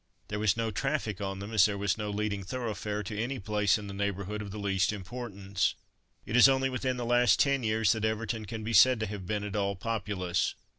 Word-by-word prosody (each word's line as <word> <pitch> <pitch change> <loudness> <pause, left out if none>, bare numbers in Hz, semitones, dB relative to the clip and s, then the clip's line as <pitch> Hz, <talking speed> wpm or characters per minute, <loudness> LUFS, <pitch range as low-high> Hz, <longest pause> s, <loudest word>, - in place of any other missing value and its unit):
There 105 - -3
was 105 -1 +2
no 115 -1 -1
traffic 115 -6 -2
on 95 -1 -3
them 100 +3 -7
as 105 -2 +6
there 100 -2 0
was 100 -1 0
no 105 -2 -4
leading 100 -1 -2
thoroughfare 105 -2 -3
to 105 +2 -4
any 130 +3 -2
place 105 0 +1
in 105 - -8
the 100 - -7
neighbourhood 100 +1 -3
of 105 - -6
the 100 - -7
least 95 -2 +1
importance. 100 -2 -3 0.5
It 110 - -3
is 125 +2 +8
only 135 0 +1
within 130 0 -1
the 120 - -3
last 120 -3 +4
ten 140 -1 +3
years 110 -2 +2
that 110 -2 -1
Everton 110 0 -1
can 110 +2 -6
be 115 +2 -3
said 130 0 +7
to - - +1
have 100 -3 -6
been 105 0 -1
at 105 -1 -5
all 100 -1 0
populous. 95 -4 -2
105 Hz, 230 wpm, -29 LUFS, 100-115 Hz, 0.5 s, is